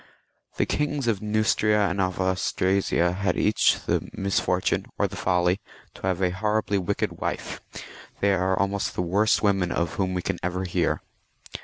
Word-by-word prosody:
The - - +2
kings 145 -2 -1
of 110 -5 0
Neustria 105 -1 +2
and 95 +2 -1
of 95 -1 -1
Austrasia 95 -1 +1
had 100 +2 -1
each 105 - +3
the - - 0
misfortune, 95 0 0
or 100 - +2
the 100 - -9
folly, 90 +1 +1 0.3
to, - - -14
have 95 0 0
a 90 - +2
horribly 105 +1 0
wicked 90 - -2
wife; - - -4 0.6
they 100 0 +3
are 95 0 +1
almost 100 +1 -1
the 90 - 0
worst 100 +7 +2
women 95 -4 +2
of 85 -2 -1
whom 95 -1 0
we 90 - -2 0.2
ever 90 +1 -2
hear. 90 - 0
95 Hz, 160 wpm, -25 LUFS, 90-105 Hz, 0.6 s, each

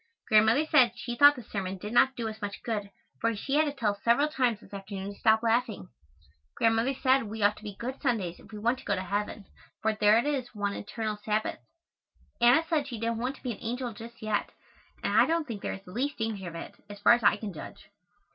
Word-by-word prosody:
Grandmother 220 +7 +5
said 250 -6 +5
she 240 0 -5
thought 285 +3 +7
the 245 - -9
sermon 195 -3 -4
did 210 +4 -7
not 265 +2 +4
do 230 -2 -3
us 220 0 -7
much 205 -1 -5
good 210 -4 -3 0.3
for 230 0 0
she 270 +7 -4
had 305 +2 +4
to 290 - -1
tell 235 -7 0
us 200 - -10
several 240 +6 +3
times 250 -7 0
this 210 - -18
afternoon 195 0 -6
to - - -19
stop 220 0 +4
laughing. 225 - 0 0.7
Grandmother 230 +4 +2
said 265 +1 +3
we 215 0 -4
ought 205 +1 +4
to - - -13
be 205 -2 -7
good 255 +5 -6
Sundays 210 - -1
if - - -17
we 215 - -7
want 235 +5 0
to - - -13
go 200 - +1
to 185 - -3
heaven, 205 +2 -3 0.3
for 220 0 +1
there 210 0 +4
it 235 - +1
is 265 -5 -2
one 205 -1 -1
eternal 215 +1 -4
Sabbath. 215 +1 -2 0.8
Anna 245 +7 +6
said 305 -4 0
she 240 -5 -6
didn't 230 0 -1
want 255 +3 -2
to - - -19
be 250 - -2
an 215 - -8
angel 245 +1 -3
just 230 +1 -11
yet 215 -1 -1 0.5
and - - 0
I - - +6
don't 330 -1 +1
think 220 -5 -6
there - - -3
is 195 - -9
the 180 - -11
least 275 +8 -2
danger 220 -5 -3
of 170 - -7
it, 165 - -7 0.2
as 205 - -8
far 205 - +6
as 240 - +2
I 205 - +4
can 210 -4 -6
judge. 155 - -11
225 Hz, 245 wpm, -29 LUFS, 205-245 Hz, 0.8 s, thought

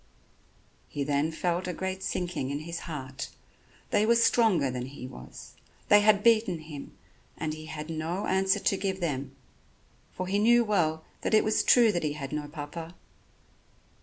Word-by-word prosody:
He 145 - -3
then 145 +2 0
felt 175 +2 -1
a 180 - -2
great 190 +2 -4
sinking 175 -7 -2
in 145 +1 -3
his 170 +1 -5
heart. 130 -4 -5 0.6
They 210 - +3
were 230 +2 +4
stronger 225 - +3
than 125 0 -4
he 130 -1 -9
was, 60 - -11 0.4
they 205 - +8
had 205 -1 +4
beaten 225 -6 +4
him 155 -3 -10 0.4
and 155 -1 -2
he 155 0 -9
had 155 -1 -6
no 165 +4 -3
answer 190 0 +2
to 195 - +1
give 190 -1 -2
them, 140 -5 -3 0.8
for 185 - -4
he 195 +2 0
knew 240 +3 +5
well 160 -7 +1 0.2
that - - +2
it 215 - +5
was 215 0 +2
true 235 -3 +6
that 175 -3 -1
he 150 -2 -1
had 140 -3 -6
no 150 -1 -3
Papa. 160 +3 -7
170 Hz, 170 wpm, -28 LUFS, 150-200 Hz, 0.8 s, they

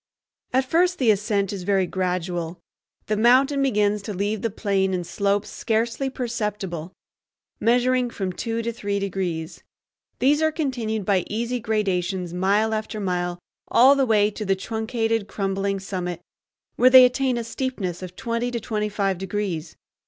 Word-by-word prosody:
At 260 +1 +2
first 355 +6 +2
the 240 -5 +4
ascent 205 -1 0
is 195 - -5
very 190 0 +2
gradual. 180 -2 -2 0.5
The 215 - 0
mountain 260 +6 +4
begins 210 -5 +2
to 205 0 -6
leave 205 +3 -1
the 230 - 0
plain 195 -2 0
in 180 - -2
slopes 200 +3 -1
scarcely 230 +4 -1
perceptible, 210 -9 -4 0.7
measuring 245 +2 +2
from 190 -5 -4
two 230 +3 -3
to 235 +1 -2
three 200 -3 -2
degrees. 180 -5 -3 0.6
These 290 +4 +3
are 315 0 +3
continued 240 - -2
by 190 -3 +2
easy 235 +3 -2
gradations 190 -5 -1
mile 200 +5 +2
after 215 0 -3
mile 175 -2 -1 0.3
all 260 +4 +6
the 275 -2 +2
way 210 -2 +3
to 215 - -5
the 195 -1 +1
truncated, 225 +1 -2
crumbling 195 -1 -1
summit, 180 -3 -4 0.6
where 255 - +6
they 255 0 +10
attain 250 0 +1
a 235 - -2
steepness 230 -7 -3
of 180 -1 -8
twenty 235 0 -2
to 240 -1 -3
twenty 210 -1 -2
five 195 -3 -1
degrees. 185 -4 -3
210 Hz, 155 wpm, -24 LUFS, 190-235 Hz, 0.7 s, they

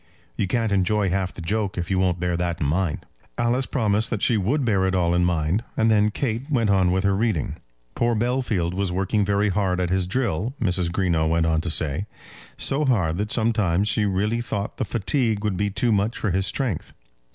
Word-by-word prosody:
You - - -1
can't 115 +2 0
enjoy 100 0 +1
half 95 -1 -1
the 85 - -9
joke 100 +2 -1
if 90 +1 -3
you 95 - +2
won't 90 -2 +1
bear 90 0 0
that 85 -1 -2
in - - -1
mind." 80 +2 -1 0.3
Alice 125 +3 +1
promised 110 -4 0
that 110 -4 -3
she 120 - +3
would 120 +8 0
bear 95 -5 +2
it 95 - 0
all 85 -2 +2
in 90 0 +2
mind, 85 +4 0
and 110 0 +3
then 105 -1 +4
Kate 120 +4 -3
went 115 -8 +2
on 95 -2 +3
with 95 +1 +1
her 100 -1 +2
reading. 105 -7 0 0.4
Poor 120 0 +1
Bellfield 110 -7 0
was 95 -1 -1
working 95 +3 0
very 100 +1 +1
hard 95 -2 0
at 90 -1 -1
his 95 -1 +1
drill, 120 - -1
Mrs. 90 -5 0
Greenow 85 -4 +1
went 85 0 +2
on 80 -1 +1
to 85 - -3
say; 80 +4 0 0.5
so 140 +3 +1
hard 95 - +1
that 105 +1 -2
sometimes 105 -5 +1
she 105 -1 +1
really 105 +4 0
thought 105 -3 -4
the - - -1
fatigue 115 -1 -1
would 105 -3 0
be 100 +2 0
too 110 +4 0
much 105 +2 +1
for 105 - -1
his 95 +1 +1
strength. 115 - -3
100 Hz, 215 wpm, -23 LUFS, 90-110 Hz, 0.5 s, then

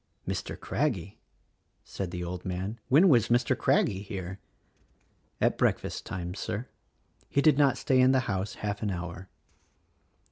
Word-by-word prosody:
"Mr. - - -3
Craggie?" - - -2 0.6
said 95 -3 -5
the 90 0 -4
old 90 +1 -5
man, 95 +5 -4
"When 155 +9 +6
was 120 - +5
Mr. 120 0 +2
Craggie 95 -1 +2
here?" 95 -2 -6 1.0
"At - - +1
breakfast - - 0
time, 90 -1 -4
Sir. 105 +5 -4 0.6
He - - +1
did 150 0 +5
not 135 -3 +4
stay 130 -1 +3
in 130 +1 +6
the 130 -1 +3
house 95 -3 -3
half 105 0 -4
an 105 - -1
hour." 90 0 -5
100 Hz, 145 wpm, -29 LUFS, 90-130 Hz, 1.0 s, When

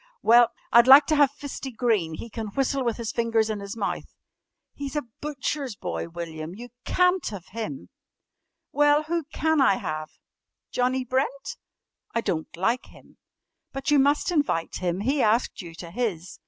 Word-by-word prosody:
"Well, 235 +1 +6 0.2
I'd 235 +1 +7
like 275 +2 +10
to 310 - +1
have 290 -2 +5
Fisty 280 -1 -7
Green. 220 -9 0
He 230 - -7
can 225 -1 -5
whistle 270 +5 -1
with 235 -3 -1
his 230 -2 -3
fingers 225 -2 +1
in 210 - -3
his 200 +3 -7
mouth." 205 - -4 0.6
"He's 280 0 -6
a 295 - 0 0.2
butcher's 280 -3 -3
boy, 170 - -4
William! 165 0 -6
You 240 +3 -9 0.2
can't 360 0 +2
have 200 -4 -6
him?" 230 +6 -6 0.8
"Well, 295 +1 +4
who 330 0 -2
can 315 -2 +1
I 230 -7 +5
have?" 155 -3 -4 0.6
"Johnnie 255 +1 0
Brent?" 270 +2 -2 0.6
"I 230 - +2
don't 160 -7 -2
like 230 +8 0
him." - - -19 0.6
"But 270 +2 -2
you 290 - +5
must 285 +6 +2
invite 285 - 0
him. 180 +1 -2
He 270 +6 +1
asked 225 +1 +1
you 170 -2 -10
to 170 0 -9
his." 185 -6 -3
240 Hz, 170 wpm, -25 LUFS, 200-280 Hz, 0.8 s, like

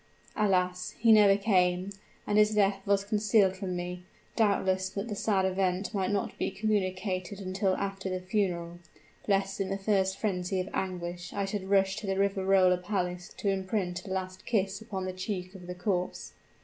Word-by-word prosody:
Alas! 180 -3 +1
he 230 0 +4
never 205 -2 +7
came; 185 -2 +2 0.3
and 210 0 +2
his 210 0 +4
death 195 -1 +3
was 200 0 +3
concealed 205 -2 +3
from 190 -1 -4
me, 180 0 -5 0.3
doubtless 190 -3 +2
that 200 +3 -4
the 210 - -4
sad 195 -2 +1
event 190 0 0
might 190 -2 0
not 200 -1 -1
be - - 0
communicated 190 -2 -1
until 190 0 0
after 195 -1 -3
the 185 0 -2
funeral, 180 -3 -2 0.5
lest 195 -1 +1
in 190 - -1
the 195 - -1
first 195 -1 +1
frenzy 185 -2 -1
of 185 - -2
anguish 175 -2 -4
I 200 -1 -1
should 195 -1 -4
rush 195 0 +3
to 215 - -5
the 195 0 0
Riverola 195 -2 +3
palace 180 -2 -3
to 200 - -1
imprint 190 -2 -1
a - - -9
last 185 0 -4
kiss 200 -3 0
upon 195 -4 -4
the 185 - -3
cheek 185 -1 -4
of 180 -3 -11
the 180 - -5
corpse. 180 0 -2
190 Hz, 175 wpm, -29 LUFS, 185-200 Hz, 0.5 s, never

